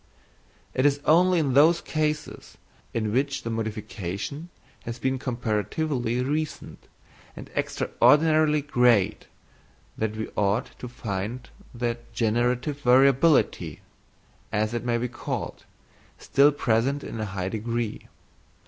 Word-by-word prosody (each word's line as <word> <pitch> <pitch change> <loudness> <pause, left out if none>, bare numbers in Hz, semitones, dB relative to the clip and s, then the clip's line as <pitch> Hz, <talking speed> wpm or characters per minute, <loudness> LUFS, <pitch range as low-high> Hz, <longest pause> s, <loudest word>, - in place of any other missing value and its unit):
It 130 - +1
is 145 0 +3
only 180 +3 +5
in 145 -5 +1
those 160 +5 +6
cases 155 -1 -3 0.3
in 110 -2 -2
which 140 +2 0
the 115 - -3
modification 110 - -5 0.3
has 115 0 -5
been 130 +1 -1
comparatively 120 +1 -1
recent 150 +3 -4 0.5
and - - -10
extraordinarily 155 -1 +3
great 120 -7 +2 0.7
that 110 -1 -1
we 110 0 -4
ought 105 +4 0
to 125 - -6
find 115 0 -5 0.2
the 120 -1 -2
generative 120 +6 0
variability, 135 +4 +3 0.7
as 110 +1 0
it 120 - -2
may 120 -1 0
be 120 +1 -1
called, 120 - -5 0.5
still 140 +2 +4
present 135 +1 0
in 115 - -6
a 110 - -2
high 95 -2 -3
degree. 115 +1 -3
125 Hz, 115 wpm, -25 LUFS, 110-145 Hz, 0.7 s, those